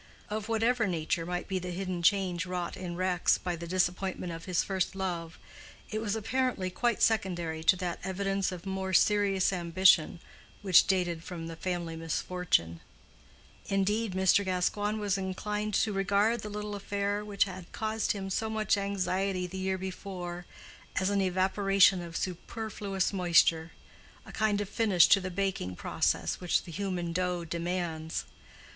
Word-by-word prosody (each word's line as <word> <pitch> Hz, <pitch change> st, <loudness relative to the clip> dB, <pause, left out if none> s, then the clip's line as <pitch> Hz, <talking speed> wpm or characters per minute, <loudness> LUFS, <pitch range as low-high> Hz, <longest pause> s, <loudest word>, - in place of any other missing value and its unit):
Of 215 Hz, +1 st, -3 dB
whatever 225 Hz, 0 st, +2 dB
nature 165 Hz, -1 st, -1 dB
might 180 Hz, 0 st, -3 dB
be 190 Hz, -1 st, -1 dB
the 180 Hz, 0 st, -6 dB
hidden 180 Hz, 0 st, -3 dB
change 185 Hz, -2 st, +2 dB
wrought 180 Hz, -1 st, -3 dB
in 180 Hz, -2 st, -5 dB
Rex 180 Hz, -1 st, +2 dB
by 180 Hz, -1 st, -3 dB
the 170 Hz, 0 st, -7 dB
disappointment 180 Hz, 0 st, -1 dB
of 165 Hz, 0 st, -8 dB
his 180 Hz, -2 st, +1 dB
first 190 Hz, -1 st, -1 dB
love, 175 Hz, -3 st, -3 dB, 0.5 s
it 215 Hz, 0 st, -2 dB
was 215 Hz, -1 st, -1 dB
apparently 225 Hz, -4 st, -1 dB
quite 235 Hz, +4 st, 0 dB
secondary 175 Hz, -7 st, 0 dB
to 185 Hz, -, +6 dB
that 180 Hz, -2 st, -3 dB
evidence 195 Hz, 0 st, -1 dB
of 180 Hz, 0 st, -8 dB
more 190 Hz, 0 st, -3 dB
serious 195 Hz, 0 st, +3 dB
ambition 175 Hz, -1 st, +4 dB, 0.4 s
which 185 Hz, -3 st, +6 dB
dated 175 Hz, -3 st, 0 dB
from 170 Hz, -2 st, -6 dB
the 165 Hz, 0 st, -6 dB
family 175 Hz, -1 st, -3 dB
misfortune; 160 Hz, -, -1 dB, 0.9 s
indeed, 205 Hz, +2 st, 0 dB
Mr. 190 Hz, +1 st, +4 dB
Gascoigne 205 Hz, +3 st, 0 dB
was 200 Hz, -2 st, 0 dB
inclined 210 Hz, +2 st, -2 dB
to 215 Hz, -, +2 dB
regard 200 Hz, +4 st, +2 dB
the 210 Hz, -, -6 dB
little 210 Hz, 0 st, -5 dB
affair 205 Hz, +1 st, -2 dB
which 205 Hz, -1 st, +1 dB
had 185 Hz, -3 st, -8 dB
caused 220 Hz, 0 st, -1 dB
him 195 Hz, -2 st, -5 dB
so 220 Hz, +4 st, -1 dB
much 215 Hz, -2 st, +1 dB
anxiety 190 Hz, -1 st, -1 dB
the 190 Hz, +1 st, -6 dB
year 190 Hz, 0 st, -1 dB
before 180 Hz, -2 st, -6 dB, 0.5 s
as 190 Hz, +1 st, +1 dB
an 200 Hz, -1 st, +2 dB
evaporation 190 Hz, 0 st, +3 dB
of 170 Hz, -1 st, -6 dB
superfluous 195 Hz, +1 st, -3 dB
moisture, 170 Hz, -3 st, +3 dB, 0.6 s
a -, -, -11 dB
kind 210 Hz, -2 st, +1 dB
of 205 Hz, -, -3 dB
finish 200 Hz, -5 st, +4 dB
to 195 Hz, -, +6 dB
the 185 Hz, -, -4 dB
baking 185 Hz, -, -2 dB
process -, -, 0 dB
which 180 Hz, -2 st, +1 dB
the 175 Hz, -, -10 dB
human 180 Hz, -2 st, -3 dB
dough 180 Hz, -1 st, -1 dB
demands. 170 Hz, -1 st, -3 dB
190 Hz, 155 wpm, -30 LUFS, 175-200 Hz, 0.9 s, to